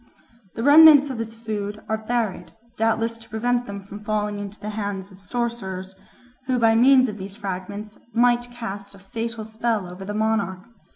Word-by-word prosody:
The 225 - -3
remnants 290 0 +8
of 245 - -5
his 225 0 -5
food 210 -2 -5
are 220 - +1
buried, 235 -5 -1 0.2
doubtless 225 +1 0
to 230 - -14
prevent 245 +3 0
them 200 -1 -6
from 205 +2 -10
falling 210 -1 -1
into 205 0 -7
the 210 - -5
hands 200 -2 -4
of 190 +1 -16
sorcerers, 195 -5 -4 0.5
who 255 -1 +2
by 225 -1 +4
means 255 +3 +6
of 210 -2 -6
these 190 +1 -7
fragments 205 +1 -6
might 240 +1 +3
cast 200 -4 -7
a - - -13
fatal 225 +3 -5
spell 220 -2 -1
over 180 +2 -9
the 205 +2 -5
monarch. 210 -3 -1
220 Hz, 175 wpm, -23 LUFS, 200-235 Hz, 0.5 s, remnants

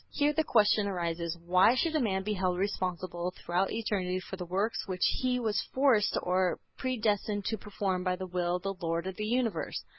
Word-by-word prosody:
Here 295 0 +1
the 315 - +2
question 210 -5 +3
arises 170 -2 -2
why 180 +7 +4
should 320 +4 +1
a - - +3
man 195 -7 0
be 210 +2 -1
held 185 -2 0
responsible 180 -2 -2
throughout 180 +3 0
eternity 190 -5 -1
for 190 - -7
the 180 -2 -6
works 200 +7 -1
which 185 -2 0 0.2
he 250 -1 +1
was 220 -3 0
forced 255 -6 +4
or 180 0 +1 0.2
predestined 210 -5 -1
to 220 - -1
perform 195 -3 -2
by 180 -1 +1
the 185 +1 -5
will 175 -1 -1
of 180 - -4
the 195 0 -1
Lord 170 -2 -2
of 190 0 -4
the 210 - -2
universe? 230 -7 -1
190 Hz, 200 wpm, -30 LUFS, 180-215 Hz, 0.2 s, why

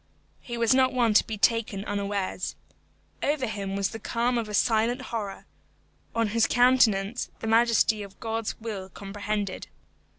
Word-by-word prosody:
He 240 -1 -6
was 230 +1 +3
not 260 0 +3
one 240 -3 +2
to - - +6
be 220 - -4
taken 215 -2 +1
unawares. 200 -2 -2 0.7
Over 290 -2 0
him 200 -4 -4
was 200 0 0
the 225 - -7
calm 235 +3 0
of 220 -2 -4
a - - -6
silent 230 +3 +2
horror: 215 -6 -5 0.7
on 230 -2 +1
his 230 +1 +2
countenance 245 -3 +3
the - - -6
majesty 225 -1 +3
of 200 -1 -10
God's 225 -1 -3
will 210 -4 -6
comprehended. 200 0 -4
220 Hz, 155 wpm, -27 LUFS, 200-235 Hz, 0.7 s, to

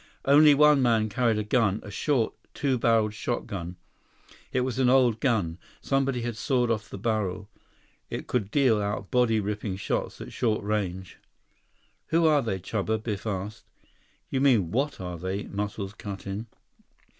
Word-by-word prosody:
Only 145 +1 +7
one 150 -1 +6
man 115 -3 +2
carried 115 +1 +1
a 105 - -1
gun, 105 -2 +1
a 105 - -9
short, 125 +1 0 0.2
two 135 -4 0
barreled 115 -2 +2
shotgun. 95 -6 -4 0.8
It 130 - +1
was 130 0 -2
an 130 -2 +4
old 125 -4 +4
gun. 100 -11 0 0.2
Someone 135 -1 0
had 120 -1 -3
sawed 125 0 +1
off 110 -2 -2
the - - -7
barrel. 105 -2 -2 0.6
It - - -5
could 110 -6 -1
deal 120 -4 +3
out 100 -1 -3
body 120 -3 +3
ripping 105 -1 -3
shots 95 - -3
at - - -9
short 110 -4 0
range. 95 -3 -3 0.9
"Who 165 +1 +2
are 150 -2 +5
they, 110 -6 -2
Chuba?" 105 +3 -2
Biff 105 -1 -4
asked. 100 +1 -4 0.7
"You 135 - 0
mean 115 -12 +3
what 140 +6 -1
are 90 -2 -5
they?" 95 +3 -3
Muscles 100 0 -4
cut 100 -2 -8
in. 100 +4 -5
110 Hz, 160 wpm, -27 LUFS, 100-125 Hz, 0.9 s, Only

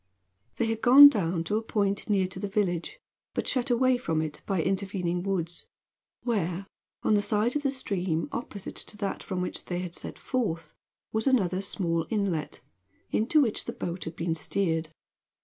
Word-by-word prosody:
They 235 - +1
had 225 0 -2
gone 280 +4 +11
down 175 -8 -1
to 210 +5 0
a - - 0
point 200 -2 -1
near 195 -3 +3
to 185 0 -6
the 205 - -2
village, 195 - -1 0.4
but - - -1
shut 255 -1 +1
away 250 +1 +3
from 165 -9 -1
it 155 -1 -4
by 195 -3 0
intervening 185 -3 -1
woods, 175 -3 -3 0.6
where, 195 -5 -1 0.4
on - - +3
the 205 - +4
side 210 +4 +1
of 295 - +1
the 280 - +1
stream 190 -11 -1
opposite 205 -5 -6
to 210 - -5
that 200 -2 -3
from 180 -1 -3
which - - -5
they 175 - -3
had 180 -2 -6
set - - -7
forth, 170 - -2 0.4
was 220 +4 0
another 190 -8 +2
small 170 -5 -1
inlet, 195 -8 -1 0.5
into 275 +8 +3
which 230 -6 0
the - - -4
boat 175 +1 -4
had 160 - -6
been 165 0 -1
steered. 165 -1 -1
195 Hz, 180 wpm, -28 LUFS, 175-220 Hz, 0.6 s, gone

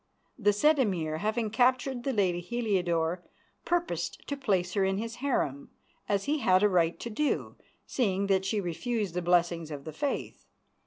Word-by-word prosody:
The 205 -2 +4
said 295 +9 +3
Emir, 170 -10 0
having 215 +4 -1
captured 250 +2 +2
the 270 - 0
lady 190 -7 +1
Heliodore, 180 -6 0 0.4
purposed 345 0 -2
to 285 - -1
place 190 -10 0
her 200 - +2
in 190 0 +1
his 230 +2 -4
harem, 240 - -1 0.4
as 200 -1 +1
he 300 +2 0
had 185 -5 +4
a 210 - +5
right 170 -3 +2
to 235 - -4
do, 295 +7 -1 0.3
seeing 200 -6 0
that 195 -1 +2
she 200 +2 0
refused 200 +2 -2
the 180 - -1
blessings 170 -2 +2
of 145 -2 -6
the 155 +1 -7
Faith. 285 -1 -3
200 Hz, 170 wpm, -29 LUFS, 175-245 Hz, 0.4 s, a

